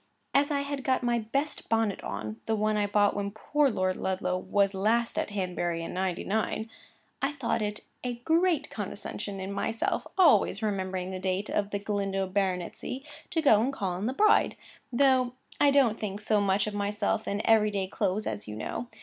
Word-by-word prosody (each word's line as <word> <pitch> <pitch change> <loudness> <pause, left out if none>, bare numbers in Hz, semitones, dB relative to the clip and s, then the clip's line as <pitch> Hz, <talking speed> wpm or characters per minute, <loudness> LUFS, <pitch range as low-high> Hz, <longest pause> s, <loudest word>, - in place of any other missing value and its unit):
As 285 +1 +4
I 285 -2 +1
had 280 -1 -4
got 260 -1 +1
my 240 -1 +2
best 275 +7 -2
bonnet 225 -3 +1
on, 110 +2 -5
the 225 - +2
one 215 0 +1
I 205 -1 +1
bought 205 0 +3
when 200 0 -1
poor 280 +7 +1
Lord 185 -4 0
Ludlow 185 -1 -1
was 195 +2 +1
last 225 +4 +1
at - - -2
Hanbury 175 -4 -2
in - - -5
'99—I 215 - -3
thought 235 -5 -1
it 210 0 -3 0.2
a 245 -1 -2
great 325 +6 +1
condescension 200 -1 -4
in 190 +1 -4
myself 225 +3 -1
(always 225 - +5
remembering 190 -3 -2
the 185 - -4
date 185 +2 -1
of 205 -1 0
the 205 - -1
Galindo 200 -1 -1
baronetcy) 190 +6 -2 0.3
to 320 - 0
go 220 -7 +6
and 255 +4 +1
call 195 -9 -2
on 185 +5 -2
the 255 - -1
bride; 425 +9 +4 0.4
though 255 -1 +3 0.3
I 290 - +6
don't 265 -6 +3
think 205 -1 -4
so 210 0 +2
much 195 0 +2
of 215 - -4
myself 205 +1 -1
in 200 - 0
my 210 - -3
every 220 -1 +5
day 200 -2 -1
clothes, 200 +2 -1
as 105 -1 -4
you 105 - -6
know. 170 - -4
210 Hz, 190 wpm, -28 LUFS, 190-240 Hz, 0.4 s, go